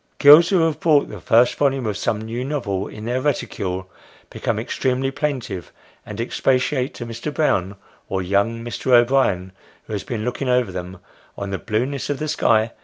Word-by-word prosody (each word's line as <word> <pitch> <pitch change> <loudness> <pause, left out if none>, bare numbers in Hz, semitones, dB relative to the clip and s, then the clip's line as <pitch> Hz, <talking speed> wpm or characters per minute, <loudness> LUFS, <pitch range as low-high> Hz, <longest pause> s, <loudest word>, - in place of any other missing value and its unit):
Girls 155 +4 +8
who 190 -4 +3
have 165 -2 +1
brought 150 -4 +3
the - - -8
first 120 +2 +4
volume 135 -3 0
of 105 -2 -1
some 105 +3 -1
new 115 +3 -4
novel 120 -9 -2
in 105 0 -9
their 125 +2 -1
reticule, 95 -9 -2 0.4
become - - -2
extremely 130 +1 -1
plaintive, 130 - -3 0.4
and 105 +1 -7
expatiate 130 +2 0
to 120 - -6
Mr. 115 +5 -5
Brown, 100 - 0 0.3
or 95 -1 -1
young 100 +5 0
Mr. 125 +2 -1
O'Brien, 120 -7 +3 0.3
who 110 - -9
has 100 - -3
been 110 -3 -4
looking 125 +2 -2
over 125 -5 +2
them, 90 0 -6 0.4
on 100 0 -5
the 95 - -3
blueness 125 +8 -2
of 145 - -1
the 155 - -3
sky. 115 -6 +2
120 Hz, 180 wpm, -21 LUFS, 105-135 Hz, 0.4 s, Girls